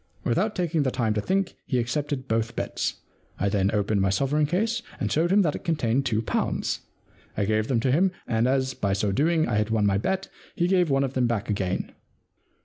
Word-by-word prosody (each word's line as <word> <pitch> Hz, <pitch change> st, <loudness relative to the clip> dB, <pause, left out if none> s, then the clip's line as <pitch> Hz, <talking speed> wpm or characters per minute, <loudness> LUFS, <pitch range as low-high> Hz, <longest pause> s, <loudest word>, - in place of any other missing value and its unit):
' -, -, -35 dB
Without 205 Hz, -, 0 dB
taking 170 Hz, -3 st, 0 dB
the 135 Hz, -, +1 dB
time 115 Hz, -4 st, 0 dB
to 105 Hz, -, -1 dB
think, 190 Hz, -, 0 dB
he 130 Hz, -, 0 dB
accepted 135 Hz, +2 st, -2 dB
both 115 Hz, -1 st, -1 dB
bets. -, -, -3 dB, 0.4 s
I 100 Hz, -, +1 dB
then 100 Hz, -1 st, +2 dB
opened 105 Hz, -1 st, +1 dB
my 95 Hz, -, +2 dB
sovereign 140 Hz, +9 st, +1 dB
case 220 Hz, +8 st, 0 dB, 0.2 s
and -, -, -1 dB
showed 165 Hz, +3 st, +2 dB
him 200 Hz, +1 st, +5 dB
that 150 Hz, -4 st, +1 dB
it -, -, -7 dB
con 165 Hz, -3 st, +1 dB
tained 125 Hz, 0 st, 0 dB
two 110 Hz, -1 st, 0 dB
pounds. -, -, -1 dB, 0.6 s
I 100 Hz, -, +1 dB
gave 110 Hz, +1 st, +1 dB
them 125 Hz, -4 st, +1 dB
to 130 Hz, -, +1 dB
him, 180 Hz, +7 st, +3 dB
and 115 Hz, +1 st, +1 dB
as 130 Hz, 0 st, +1 dB
by 100 Hz, -1 st, -1 dB
so 100 Hz, +1 st, 0 dB
doing 160 Hz, -, +2 dB
I 110 Hz, -, 0 dB
had 105 Hz, 0 st, +1 dB
won 110 Hz, -2 st, +2 dB
my 100 Hz, -1 st, +2 dB
bet 190 Hz, -, -1 dB, 0.3 s
he 175 Hz, -, +1 dB
gave 180 Hz, -2 st, +3 dB
me -, -, +2 dB
one 135 Hz, 0 st, +3 dB
of 135 Hz, -1 st, -2 dB
them 125 Hz, -2 st, +2 dB
back 110 Hz, -3 st, -1 dB
again. 95 Hz, -3 st, -2 dB
130 Hz, 235 wpm, -26 LUFS, 110-165 Hz, 0.6 s, him